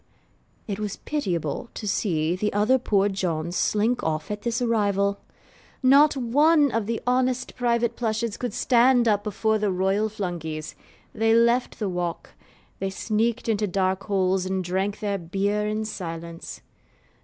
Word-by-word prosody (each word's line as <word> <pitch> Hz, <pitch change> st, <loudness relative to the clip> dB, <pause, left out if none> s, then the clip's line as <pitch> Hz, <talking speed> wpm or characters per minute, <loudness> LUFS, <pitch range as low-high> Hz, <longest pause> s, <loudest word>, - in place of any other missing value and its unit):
It 200 Hz, -1 st, -4 dB
was 210 Hz, -2 st, -4 dB
pitiable 185 Hz, -, -3 dB
to 210 Hz, -, -5 dB
see 170 Hz, -5 st, 0 dB
the 210 Hz, +3 st, -1 dB
other 215 Hz, +6 st, +3 dB
poor 205 Hz, -4 st, +2 dB
Johns 175 Hz, -4 st, -2 dB
slink 220 Hz, +6 st, +1 dB
off 155 Hz, +4 st, -2 dB
at 210 Hz, 0 st, -4 dB
this 235 Hz, +2 st, -1 dB
arrival! 200 Hz, -4 st, +1 dB, 0.6 s
Not 280 Hz, +3 st, +6 dB
one 290 Hz, +4 st, +3 dB
of 225 Hz, -2 st, -1 dB
the 230 Hz, 0 st, -1 dB
honest 255 Hz, 0 st, 0 dB
private 235 Hz, -1 st, +1 dB
Plushes 220 Hz, -1 st, -1 dB
could 245 Hz, -4 st, -4 dB
stand 245 Hz, -1 st, +4 dB
up 205 Hz, -2 st, +2 dB
before 215 Hz, +1 st, 0 dB
the 210 Hz, -1 st, +1 dB
Royal 195 Hz, +4 st, +1 dB
Flunkeys. 170 Hz, -7 st, -5 dB, 0.4 s
They 225 Hz, +1 st, +2 dB
left 235 Hz, +2 st, +2 dB
the 210 Hz, -, -2 dB
walk: 175 Hz, -2 st, -3 dB, 0.5 s
they 195 Hz, -, -1 dB
sneaked 220 Hz, +5 st, -1 dB
into 215 Hz, -2 st, +1 dB
dark 190 Hz, +1 st, 0 dB
holes 190 Hz, -2 st, +1 dB
and 190 Hz, 0 st, -1 dB
drank 190 Hz, +3 st, -2 dB
their 200 Hz, -2 st, -1 dB
beer 200 Hz, +5 st, -1 dB
in 215 Hz, +1 st, -2 dB
silence. 170 Hz, -4 st, -7 dB
210 Hz, 150 wpm, -25 LUFS, 190-235 Hz, 0.6 s, Not